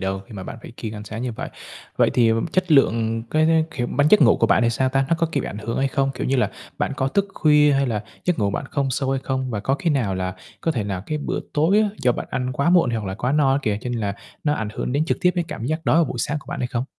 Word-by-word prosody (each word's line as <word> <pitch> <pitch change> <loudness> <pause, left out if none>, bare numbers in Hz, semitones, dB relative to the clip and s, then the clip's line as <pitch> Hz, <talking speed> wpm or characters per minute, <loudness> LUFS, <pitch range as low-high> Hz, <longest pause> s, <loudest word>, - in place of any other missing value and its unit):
đâu 95 0 -2
khi - - -12
mà 95 - -6
bạn 115 - -7
phải - - -9
kiêng 110 -2 -5
ăn 105 0 -7
sáng 110 +2 -6
như 125 -1 -2
vậy. - - -6 0.5
Vậy - - +4
thì 115 -2 +4 0.2
chất 185 -2 +1
lượng 115 -5 +3
cái, 160 +1 +3
kiểu, 120 -2 0
bạn 145 +4 +1
giấc 210 - +7
ngủ - - +6
của - - +2
bạn - - +3
thì 115 - +3
sao 130 +3 +1
ta? 135 +1 +1
Nó 165 - +3
có, 165 - +2
kiểu, 140 - +1
bị - - -5
ảnh 100 - -6
hưởng 115 +2 -3
hay 135 - +2
không? 135 0 0
Kiểu - - -3
như 135 - +1
là, 125 - +1 0.3
bạn - - -1
có 130 0 0
thức 200 +7 0
khuya 150 -1 +4
hay 135 0 +2
là 110 -4 -2 0.2
giấc 180 -4 +1
ngủ 100 -2 +1
bạn 100 - -3
không 140 -2 0
sâu 135 +1 -1
hay 135 -1 0
không? 130 -1 -2
Và 105 -3 -2
có 135 - +1
khi 165 +4 -1
nào 120 -10 0
là 95 0 -3 0.3
có 165 - 0
thể 110 -7 -2
là 95 -3 -3
cái 155 - -2
bữa 145 - -3
tối 165 +8 +3
á 215 - +2
do 125 - +4
bạn - - -5
ăn 125 0 -2
quá 140 +7 +1
muộn 175 -8 +4
hoặc 115 -2 -2
là 95 -1 -3
quá 125 +6 -1
no 145 -3 +3
á 135 - +2
kìa, 105 -4 0
cho 125 - -4
nên 120 -2 -2
là 100 -2 -2 0.3
nó 150 - +2
ảnh 110 -6 -3
hưởng 125 - -3
đến 145 +3 +1
trực 165 - -1
tiếp 180 - +4
cái 175 - 0
cảm 115 - -5
giác 155 +4 -2
đói - - +3
vào 170 - +5
buổi - - -5
sáng 150 - -1
của - - -19
bạn - - -4
hay 125 - 0
không? 120 0 -2
130 Hz, 320 wpm, -22 LUFS, 115-150 Hz, 0.5 s, giấc